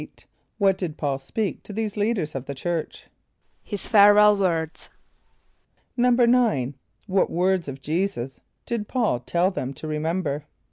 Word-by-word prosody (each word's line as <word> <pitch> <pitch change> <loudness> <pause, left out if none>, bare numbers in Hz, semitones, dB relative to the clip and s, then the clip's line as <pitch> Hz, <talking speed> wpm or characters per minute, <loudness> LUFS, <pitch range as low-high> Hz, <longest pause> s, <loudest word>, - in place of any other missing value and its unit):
= - - -44
What 195 -2 +2
did 165 -5 -4
P[a:]ul 140 -3 -1
speak 205 +9 -3
to - - -11
these 215 0 -3
leaders 205 -7 -1
of 135 -1 -5
the 140 - -5
church? 165 +3 -4 0.6
=His 205 -2 -4
farewell 210 0 +7
words.= 165 -5 -2 1.1
=9.= 240 - +3 0.3
What 195 -1 +1
words 180 -1 +1
of 135 -1 -7
J[=e]´[s+]us 160 -4 -2 0.2
did 225 -3 -3
P[a:]ul 230 - 0
tell 175 +8 +1
them 135 -6 -4
to 155 - -8
remember? 155 -1 -2
185 Hz, 140 wpm, -24 LUFS, 150-210 Hz, 1.1 s, farewell